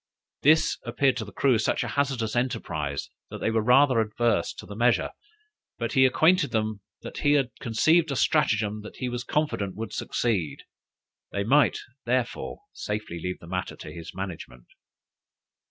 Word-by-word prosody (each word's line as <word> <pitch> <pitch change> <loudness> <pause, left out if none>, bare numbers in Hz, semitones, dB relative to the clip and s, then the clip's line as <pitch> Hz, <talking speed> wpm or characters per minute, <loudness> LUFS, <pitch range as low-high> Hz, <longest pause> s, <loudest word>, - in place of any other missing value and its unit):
This 155 +3 +4
appeared 135 -4 +1
to 110 - -3
the 105 - -11
crew 125 +3 +2
such 115 - +1
a 115 - -4
hazardous 125 -3 -1
enterprise, 75 - -2 0.2
that - - -6
they 115 - -1
were 110 0 +2
rather 125 +2 +5
adverse 115 +2 +1
to - - -9
the 100 - -9
measure. 120 +2 +2 0.7
But 115 -2 -3
he 130 0 +6
acquainted 160 +4 +3
them 110 -2 -1 0.2
that - - -7
he 145 0 +3
had 135 -4 +2
conceived 160 +8 +3
a 140 - -1
stratagem 110 -8 +1
that 105 - -10
he 125 - -3
was 120 0 -4
confident 125 -12 -1
would 110 -1 -5
succeed; 90 -12 -1 0.7
they 100 - -1
might, 135 +2 +4 0.3
therefore, 125 0 -2
safely 105 -5 -4
leave 90 +1 -3
the - - -14
matter 90 +1 -3
to - - -9
his 85 -1 -8
management. 80 -10 -7
115 Hz, 165 wpm, -26 LUFS, 105-135 Hz, 0.7 s, he